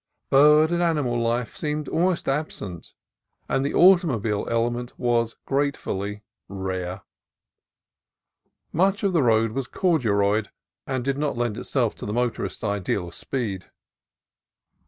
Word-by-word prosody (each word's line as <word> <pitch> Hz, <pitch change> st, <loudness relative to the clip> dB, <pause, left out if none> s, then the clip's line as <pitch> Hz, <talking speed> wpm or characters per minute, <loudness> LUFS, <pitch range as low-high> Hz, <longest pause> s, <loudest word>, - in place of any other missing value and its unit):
Bird 150 Hz, +3 st, +6 dB
and 175 Hz, 0 st, +1 dB
animal 150 Hz, -8 st, +1 dB
life 115 Hz, +1 st, -1 dB
seemed 150 Hz, -1 st, -3 dB
almost 175 Hz, +1 st, 0 dB
absent, 120 Hz, -, -4 dB, 0.5 s
and 135 Hz, -, 0 dB
the 140 Hz, -, -2 dB
automobile 140 Hz, -, +4 dB
element 120 Hz, +1 st, -1 dB
was 115 Hz, -1 st, 0 dB
gratefully 105 Hz, -7 st, -2 dB, 0.2 s
rare. 95 Hz, -1 st, -4 dB, 1.7 s
Much 195 Hz, +5 st, +2 dB
of 195 Hz, -2 st, +1 dB
the 165 Hz, -, +3 dB
road 115 Hz, -2 st, +3 dB
was 135 Hz, +1 st, -3 dB
"corduroyed," 105 Hz, -, +1 dB, 0.4 s
and 130 Hz, -2 st, -2 dB
did 135 Hz, 0 st, -1 dB
not 145 Hz, -4 st, -1 dB
lend 120 Hz, -3 st, -1 dB
itself -, -, -1 dB
to -, -, -6 dB
the 105 Hz, -, -3 dB
motorist's 120 Hz, 0 st, -2 dB
ideal 100 Hz, -3 st, -1 dB
of -, -, -14 dB
speed. 100 Hz, -1 st, -4 dB
120 Hz, 125 wpm, -24 LUFS, 105-150 Hz, 1.7 s, Bird